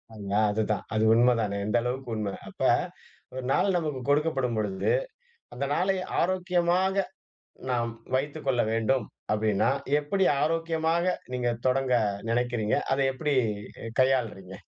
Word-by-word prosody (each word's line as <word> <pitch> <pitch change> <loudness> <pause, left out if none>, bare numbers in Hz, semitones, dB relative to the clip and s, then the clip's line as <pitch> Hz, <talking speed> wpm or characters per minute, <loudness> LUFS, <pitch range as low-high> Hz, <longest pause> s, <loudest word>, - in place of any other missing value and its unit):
அ - - -15 0.4
அதுதான், 105 -2 -1
அது 110 0 +2
உண்மை 120 +2 +5
தானே, 100 -2 -2
எந்த 105 - -1
அளவுக்கு 125 +1 -3
உண்மை. 105 -2 -2 0.2
அப்ப - - -14 0.7
ஒரு 130 0 -5
நாள் 195 +6 +2
நமக்கு 150 -6 -2
கொடுக்கப்படும் 145 -5 +1
பொழுது, 100 -3 0 0.6
அந்த 135 +3 -2
நாளை 190 +5 +1 0.3
ஆரோக்கியமாக, 185 +1 +1 0.6
நாம் 120 -2 0 0.2
வைத்துக்கொள்ள 135 -2 0
வேண்டும் 115 +2 +1 0.3
அப்படின்னா, 105 +1 +2 0.3
எப்படி 190 +6 0 0.2
ஆரோக்கியமாக 165 +2 +1 0.2
நீங்க 125 -1 0 0.2
தொடங்க 130 0 +1 0.4
நினைக்கிறீங்க. 120 -3 0 0.2
அதை 135 +1 +1
எப்படி 150 +2 -1 0.5
எ - - -5
கையாள்றீங்க? 115 -8 0
130 Hz, 120 wpm, -27 LUFS, 115-160 Hz, 0.7 s, உண்மை